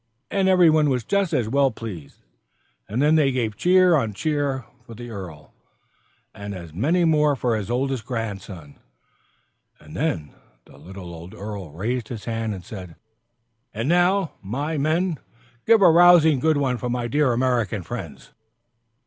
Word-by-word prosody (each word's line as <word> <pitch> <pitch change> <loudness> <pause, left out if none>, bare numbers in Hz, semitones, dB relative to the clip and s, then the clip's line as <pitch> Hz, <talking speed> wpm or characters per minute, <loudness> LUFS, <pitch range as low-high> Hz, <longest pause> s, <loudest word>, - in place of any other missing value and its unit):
And 195 -1 +2
every 180 -3 +5
one 155 -1 +3
was 125 -3 0
just 200 - 0
as 125 -8 0
well 140 +3 +2
pleased. 105 - -9 0.7
And 120 +7 0
then 150 +1 +4
they 150 -4 +3
gave 115 -5 -2
cheer 180 - +4
on 115 -8 -1
cheer 145 -2 -1 0.2
for 115 - -12
the 120 +1 -9
earl, 85 -8 -9 0.8
and 100 -1 -7
as 85 -4 -10
many 160 - +1
more 150 -2 +3
for 125 -3 0
his 105 -1 -4
oldest 130 0 -1
grandson. 100 - -6 1.0
And - - -13
then 75 -2 -2 0.3
the - - -18
little 90 -2 -10
old 85 +2 -11
earl 100 -4 -7
raised 110 +8 -3
his 115 -4 -8
hand 115 -2 -3
and 90 -2 -11
said, 90 -6 -9 0.8
"And 115 +4 -2
now, 180 +2 +2
my 140 +11 -3
men, 160 +3 0 0.5
give 225 -2 +5
a 170 - +8
rousing 165 -4 +6
good 155 +2 +2
one 130 -3 0
for 125 - -3
my 120 -1 -2
dear 145 +2 +2
American 120 -5 0
friends!" 85 - -8
125 Hz, 160 wpm, -23 LUFS, 105-155 Hz, 1.0 s, a